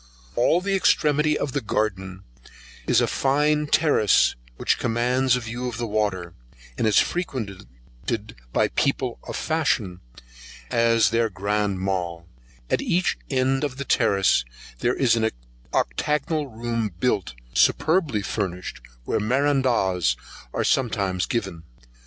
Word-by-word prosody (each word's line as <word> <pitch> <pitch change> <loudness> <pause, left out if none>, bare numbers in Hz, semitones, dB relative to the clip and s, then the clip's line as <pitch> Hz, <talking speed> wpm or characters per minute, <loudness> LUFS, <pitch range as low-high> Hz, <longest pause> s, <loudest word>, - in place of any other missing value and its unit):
All 160 - +3
the 200 +1 -1
extremity 150 -5 +3
of 145 - -2
the - - -1
garden 95 -3 -2 0.6
is - - +4
a - - +3
fine 150 +2 +1
terrace 145 - +3 0.2
which - - +1
commands 125 +2 +2
a 125 - -2
view 120 +2 -4
of 120 -2 -5
the 120 - -2
water, 100 -5 -1 0.4
and 110 - 0
is 105 - +3
frequented 120 - -1 0.8
by - - +2
people - - -1
of - - -5
fashion, 90 -1 0 0.7
as 115 -3 +3
their 115 0 +2
Grand 100 0 -1
Mall: 90 -3 -2 0.4
at - - 0
each 175 +1 +1
end 135 0 +1
of 135 -3 -3
the 140 - -4
terrace 100 - +3 0.4
there 120 - +1
is 125 -4 +3
an 110 -1 +1 0.4
octagonal 150 - 0 0.5
built 100 - 0
room, - - -25
superbly 155 - +2
furnished, 90 - -4 0.2
where 110 - -1
merendas[96 120 - +2 0.4
1] - - -2
are - - +1
sometimes 100 -8 +1
given. 95 -8 -3
115 Hz, 130 wpm, -24 LUFS, 95-135 Hz, 0.8 s, is